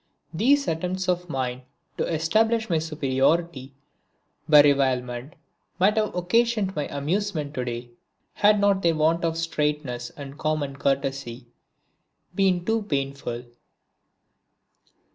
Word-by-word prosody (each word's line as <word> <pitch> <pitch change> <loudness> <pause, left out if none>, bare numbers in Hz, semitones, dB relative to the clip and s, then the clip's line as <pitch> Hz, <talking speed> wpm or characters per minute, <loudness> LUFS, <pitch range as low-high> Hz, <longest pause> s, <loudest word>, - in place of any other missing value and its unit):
These 280 - +3
attempts 180 +3 -2
of 180 -1 -1
mine 130 -3 -3 0.4
to - - -1
establish 220 +7 +1
my 165 - +3
superiority 145 -1 0 0.7
by 150 -1 +9
revilement 130 -2 +1 0.4
might 195 +4 +3
have 215 -4 0
occasioned 205 +2 +1
me 150 - -2
amusement 155 0 -2
to 130 - -2
day, 120 0 -5 0.4
had 210 +1 +4
not 200 -1 +3
their 170 -2 +2
want 160 +2 +2
of 165 -1 0
straightness 150 -6 -2
and 140 0 -9
common 150 -3 -2
courtesy 135 -3 -2 0.9
been 180 -2 +1
too 225 +1 +1
painful. 140 - -3
155 Hz, 115 wpm, -25 LUFS, 135-185 Hz, 0.9 s, by